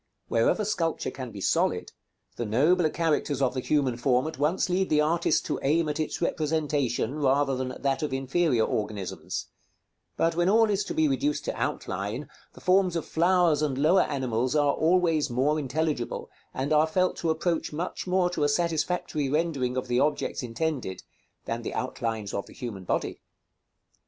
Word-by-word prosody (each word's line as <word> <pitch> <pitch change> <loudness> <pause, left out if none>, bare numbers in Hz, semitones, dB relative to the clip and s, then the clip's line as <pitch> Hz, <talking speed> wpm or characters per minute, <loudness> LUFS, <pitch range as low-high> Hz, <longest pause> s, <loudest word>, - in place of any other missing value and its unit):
Wherever 115 - +2
sculpture 165 -6 -1
can 130 -2 -6
be 105 -3 -9
solid, - - +1 0.4
the - - -3
nobler 155 - +3
characters 155 -4 0
of 130 -3 +1
the 130 - -2
human 130 -2 +1
form 125 +1 +2
at 160 -4 -5
once 155 +7 +1
lead 185 +1 0
the 150 - +3
artist 165 +3 +2
to - - -2
aim 155 +4 +2
at 150 +1 -3
its 155 - -2
representation, 150 -7 0
rather 135 -1 +2
than 130 0 -3
at 130 - -11
that 135 +2 +1
of 150 - -2
inferior 135 -1 +1
organisms; 105 -3 -3 0.7
but 165 0 +2
when 175 +2 +2
all 220 +1 +4
is 200 0 +1
to - - -5
be 155 -1 +3
reduced 140 +2 0
to - - -2
outline, 100 +9 -3 0.3
the - - -14
forms 185 -1 +3
of 165 - -2
flowers 170 -2 +3
and 145 -4 0
lower 165 +7 +4
animals 130 -2 -1
are 145 -1 +3
always 165 -3 +2
more 135 +6 +1
intelligible, 145 -2 -2 0.2
and 135 +4 -1
are 155 +1 +4
felt 185 +3 +1
to 165 - -1
approach 165 +1 0
much 170 +4 -4
more 180 0 +2
to 155 - -1
a 145 - +3
satisfactory 160 -2 0
rendering 140 -5 0
of 130 - -2
the 125 0 +1
objects 145 +2 0
intended, 125 - -3 0.4
than 115 +1 -3
the - - -5
outlines 115 -5 -3
of 100 - -3
the - - -13
human 105 -7 -7
body. - - -2
150 Hz, 175 wpm, -27 LUFS, 130-165 Hz, 0.7 s, all